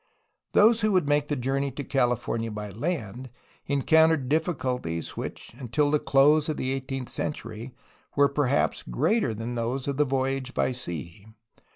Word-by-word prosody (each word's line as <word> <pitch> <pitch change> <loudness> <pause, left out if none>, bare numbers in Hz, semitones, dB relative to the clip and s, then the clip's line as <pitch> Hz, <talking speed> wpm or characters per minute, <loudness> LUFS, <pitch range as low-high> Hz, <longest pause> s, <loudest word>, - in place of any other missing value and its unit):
Those 225 +2 +5
who 215 -1 +2
would 180 -6 +2
make 145 0 +2
the 145 - -1
journey 135 +2 -1
to 140 - -5
California 120 -4 0
by 105 -1 -6
land 125 - -4 0.4
encountered 155 0 +3
difficulties 130 - -1
which - - -7
until 140 +4 0
the 150 - +3
close 145 +3 +4
of 155 - -2
the 130 - -1
eighteenth 135 -1 -4
century 115 -3 -5 0.4
were 145 0 +5
perhaps 140 -1 +1
greater 115 - 0
than 115 +3 -4
those 120 +3 -2
of 140 -1 -2
the 150 - +4
voyage 135 -1 -2
by - - +1
sea. 85 -4 -7
135 Hz, 155 wpm, -26 LUFS, 120-145 Hz, 0.4 s, Those